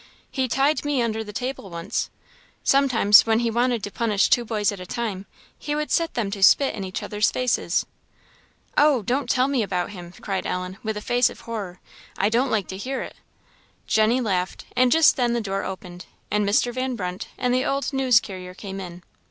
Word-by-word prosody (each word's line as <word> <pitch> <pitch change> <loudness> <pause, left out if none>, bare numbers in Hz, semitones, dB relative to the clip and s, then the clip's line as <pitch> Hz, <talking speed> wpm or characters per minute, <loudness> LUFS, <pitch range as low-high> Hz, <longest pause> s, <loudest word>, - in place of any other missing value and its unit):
He 265 -2 0
tied 275 +5 +1
me 290 -2 0
under 225 -2 -1
the 210 - -9
table 250 -2 -5
once. 170 +5 -3 0.5
Sometime, 265 -7 +2
when 225 0 +2
he 235 -1 0
wanted 240 -1 +1
to 205 - -4
punish 210 -3 +1
two 240 - +4
boys 215 -3 0
at 200 - -7
a 180 - -7
time, 205 -4 -4 0.3
he 295 0 -3
would 300 0 -3
set 330 -1 +1
them 215 -5 -1
to 200 -1 -5
spit 270 +8 +5
in 200 - -5
each 185 -1 -5
other's 210 0 +1
faces." 255 -1 0 0.9
"Oh! 290 -6 +4
don't 260 +7 -1
tell 255 +1 +3
me 275 -3 +1
about 185 -2 -2
him!" 175 -3 -9
cried 195 -2 -3
Ellen, 180 +2 -4
with 220 -1 -3
a - - -4
face 245 +2 +2
of - - -12
horror: 200 -6 -6 0.4
"I 200 - +2
don't 245 +4 +1
like 210 -5 0
to 190 - -5
hear 260 +6 -3
it." - - -9 0.7
Jenny 220 +3 +3
laughed; 190 -6 -2
and 250 0 +4
just 320 +2 +5
then 240 -2 +1
the 235 - +1
door 195 -3 -3
opened, 180 -1 -7 0.2
and 210 -1 +1
Mr. 240 +4 +2
Van 255 0 -2
Brunt 180 -3 -5
and 250 -1 0
the 255 +1 +2
old 275 +1 -1
news 260 -3 +4
carrier 185 -5 -9
came 195 -1 -7
in. 175 -1 -8
220 Hz, 205 wpm, -24 LUFS, 195-255 Hz, 0.9 s, spit